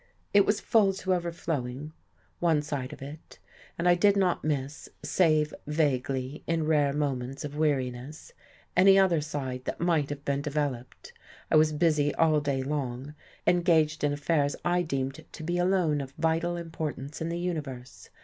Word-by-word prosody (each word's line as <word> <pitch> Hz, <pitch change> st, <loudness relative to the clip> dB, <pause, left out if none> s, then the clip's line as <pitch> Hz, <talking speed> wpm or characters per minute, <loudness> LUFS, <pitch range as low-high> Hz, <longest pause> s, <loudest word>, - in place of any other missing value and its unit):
It 200 Hz, -1 st, +5 dB
was 210 Hz, 0 st, +2 dB
full 200 Hz, -2 st, +3 dB
to 190 Hz, 0 st, -1 dB
overflowing 155 Hz, -5 st, -3 dB, 0.5 s
one 160 Hz, -4 st, +2 dB
side 145 Hz, -3 st, -4 dB
of 150 Hz, -, -9 dB
it; 150 Hz, +3 st, -10 dB, 0.4 s
and 170 Hz, -, 0 dB
I 175 Hz, -, +7 dB
did 200 Hz, +3 st, +4 dB
not 185 Hz, -3 st, +1 dB
miss 145 Hz, -1 st, -3 dB
(save 155 Hz, -4 st, +2 dB
vaguely, 135 Hz, -3 st, -1 dB
in 165 Hz, -1 st, 0 dB
rare 150 Hz, -3 st, +3 dB
moments 135 Hz, -1 st, -2 dB
of 145 Hz, 0 st, -7 dB
weariness) 140 Hz, -1 st, -2 dB, 0.4 s
any 195 Hz, +2 st, +7 dB
other 185 Hz, -5 st, +4 dB
side 135 Hz, -4 st, -4 dB
that -, -, -4 dB
might 165 Hz, -4 st, +1 dB
have 145 Hz, 0 st, -6 dB
been 140 Hz, -1 st, 0 dB
developed. 140 Hz, -4 st, -4 dB, 0.4 s
I -, -, +4 dB
was 155 Hz, 0 st, +5 dB
busy 150 Hz, -2 st, +2 dB
all 155 Hz, -2 st, +3 dB
day 140 Hz, -2 st, -1 dB
long, 135 Hz, -1 st, -3 dB, 0.3 s
engaged 165 Hz, -4 st, +3 dB
in 145 Hz, -, +2 dB
affairs 145 Hz, 0 st, 0 dB
I 175 Hz, 0 st, +2 dB
deemed 135 Hz, -5 st, -3 dB
to 160 Hz, -, -9 dB
be 175 Hz, +2 st, -1 dB
alone 175 Hz, -5 st, +2 dB
of 135 Hz, 0 st, -9 dB
vital 165 Hz, +2 st, 0 dB
importance 155 Hz, -4 st, -5 dB
in 160 Hz, -, -2 dB
the 170 Hz, -, -2 dB
universe. 145 Hz, -8 st, -5 dB
150 Hz, 160 wpm, -28 LUFS, 140-170 Hz, 0.5 s, I